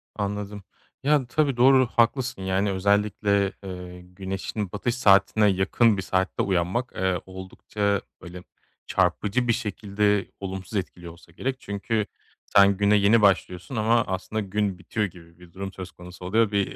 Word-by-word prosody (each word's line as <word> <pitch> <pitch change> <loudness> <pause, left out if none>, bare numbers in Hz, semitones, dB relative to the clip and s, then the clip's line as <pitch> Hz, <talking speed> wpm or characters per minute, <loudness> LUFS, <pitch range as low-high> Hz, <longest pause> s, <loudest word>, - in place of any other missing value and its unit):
Anladım. 100 0 -4 0.4
Yani, 145 -3 +2
tabii, 140 -1 0
doğru, 130 0 +5
haklısın. 120 -1 +1
Yani 95 +2 0
özellikle, 100 0 +1
eee, 90 -1 -8
güneşin 95 +2 -5
batış 120 +4 -2
saatine 100 -1 +4
yakın 100 +3 +3
bir 95 - -2
saatte 95 0 -1
uyanmak, 95 +7 -1
eee, 95 -2 0
oldukça, 95 +2 -3 0.2
böyle, 90 0 -10 0.4
çarpıcı 100 +6 +1
bir 115 - +4
şekilde 105 -2 -1
olumsuz 95 +1 -6
etkiliyor 90 -2 -6
olsa 85 0 -19
gerek 130 +9 -3
çünkü 100 +1 -2 0.4
sen, 100 -1 +5
güne 105 +1 +3
yeni 105 +2 +4
başlıyorsun 95 +2 +1
ama 115 +1 +3
aslında 95 +4 -3
gün 100 -1 -1
bitiyor 105 +3 -2
gibi 85 -2 -13
bir 90 -1 -16
durum 95 0 -6
söz 95 -1 -8
konusu 90 +1 -12
oluyor. 110 +3 +2
Bir 100 -1 -1
100 Hz, 145 wpm, -25 LUFS, 95-110 Hz, 0.4 s, doğru